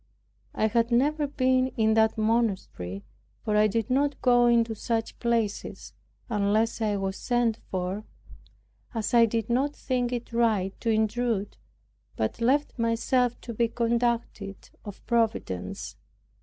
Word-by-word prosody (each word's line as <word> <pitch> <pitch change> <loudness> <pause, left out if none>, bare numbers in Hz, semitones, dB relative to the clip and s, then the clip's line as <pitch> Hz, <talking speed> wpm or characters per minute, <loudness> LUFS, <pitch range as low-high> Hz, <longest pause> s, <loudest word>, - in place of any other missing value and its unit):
I - - +1
had 230 +2 +2
never 290 +5 +2
been 260 -2 +2
in 220 -1 +3
that 220 0 +3
monastery; 210 - -1 0.4
for 210 -2 0
I 210 0 +5
did 225 +2 -2
not 280 +2 +1
go 245 -1 +5
into 230 -1 +3
such 225 +1 -3
places, 230 -4 -2 0.3
unless 215 +1 +1
I 210 -2 +1
was 195 0 -2
sent 240 -3 0
for, 185 +3 -3 0.9
as 220 0 -2
I 235 -1 +6
did 225 -1 -2
not 270 +5 0
think 250 -2 -1
it 240 -1 -5
right 215 -5 +1
to 230 - -2
intrude, 220 -1 0 0.6
but 110 - -2
left 270 +2 +1
myself 235 +2 +1
to 235 - -7
be 235 +1 +1
conducted 235 -4 -2
of 205 -3 -10
Providence. 215 - -1
230 Hz, 135 wpm, -27 LUFS, 215-240 Hz, 0.9 s, I